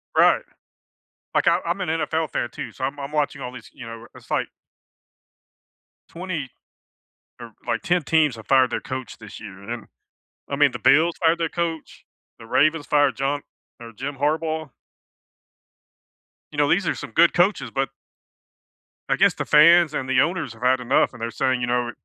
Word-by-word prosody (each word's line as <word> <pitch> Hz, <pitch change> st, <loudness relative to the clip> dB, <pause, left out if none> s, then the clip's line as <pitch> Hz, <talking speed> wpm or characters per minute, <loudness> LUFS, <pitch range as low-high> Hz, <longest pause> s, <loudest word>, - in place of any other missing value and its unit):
Right. -, -, +5 dB, 0.9 s
Like, -, -, +3 dB
I 170 Hz, +1 st, +4 dB
I'm 175 Hz, +3 st, -1 dB
an 180 Hz, -, -2 dB
NFL 160 Hz, -1 st, -1 dB
fan, 120 Hz, -, -2 dB
too, -, -, -7 dB
so 130 Hz, -, -6 dB
I'm 140 Hz, +2 st, -3 dB
I'm 140 Hz, +1 st, -6 dB
watching 145 Hz, -2 st, -1 dB
all 125 Hz, 0 st, -6 dB
these, 125 Hz, -3 st, -12 dB
you 125 Hz, -, -10 dB
know 115 Hz, 0 st, -9 dB
it's -, -, -16 dB
like -, -, 0 dB, 1.6 s
20, 165 Hz, -7 st, -5 dB, 0.9 s
or, 115 Hz, -2 st, -10 dB
like, -, -, -1 dB
10 180 Hz, -4 st, +1 dB
teams 150 Hz, -4 st, +2 dB
have 110 Hz, -, -11 dB
fired 130 Hz, -2 st, +4 dB
their -, -, -2 dB
coach 130 Hz, -3 st, -6 dB
this 110 Hz, -3 st, -11 dB
year, 100 Hz, -3 st, -10 dB
and 100 Hz, +3 st, -12 dB
then 120 Hz, -2 st, -5 dB, 0.6 s
I 140 Hz, -, -2 dB
mean, 145 Hz, -2 st, +4 dB
the 120 Hz, -, -6 dB
Bills 160 Hz, +8 st, +4 dB
fired 165 Hz, +1 st, +4 dB
their 165 Hz, -2 st, -1 dB
coach, 165 Hz, -2 st, -4 dB, 0.3 s
the 115 Hz, -, -11 dB
Ravens 155 Hz, +5 st, +2 dB
fired 145 Hz, -2 st, +3 dB
John 140 Hz, +1 st, -1 dB, 0.4 s
or 115 Hz, -1 st, -10 dB
Jim 135 Hz, +5 st, -6 dB
Harbaugh. 155 Hz, +1 st, -1 dB, 1.8 s
You 150 Hz, -, -10 dB
know, 145 Hz, 0 st, +3 dB
these 180 Hz, -1 st, +2 dB
are -, -, 0 dB
some -, -, -8 dB
good 170 Hz, 0 st, +4 dB
coaches, 175 Hz, -, +2 dB
but 135 Hz, 0 st, 0 dB, 1.2 s
I -, -, +3 dB
guess -, -, +4 dB
the -, -, -4 dB
fans 170 Hz, +1 st, +6 dB
and 130 Hz, -2 st, -3 dB
the 130 Hz, -1 st, +3 dB
owners 160 Hz, -4 st, 0 dB
have 115 Hz, +2 st, -12 dB
had 130 Hz, 0 st, +3 dB
enough, 125 Hz, +3 st, +2 dB
and 120 Hz, -, -12 dB
they're 115 Hz, 0 st, -3 dB
saying, 130 Hz, +1 st, 0 dB
you 120 Hz, -, -1 dB
know 120 Hz, 0 st, 0 dB
140 Hz, 185 wpm, -23 LUFS, 125-160 Hz, 1.8 s, fans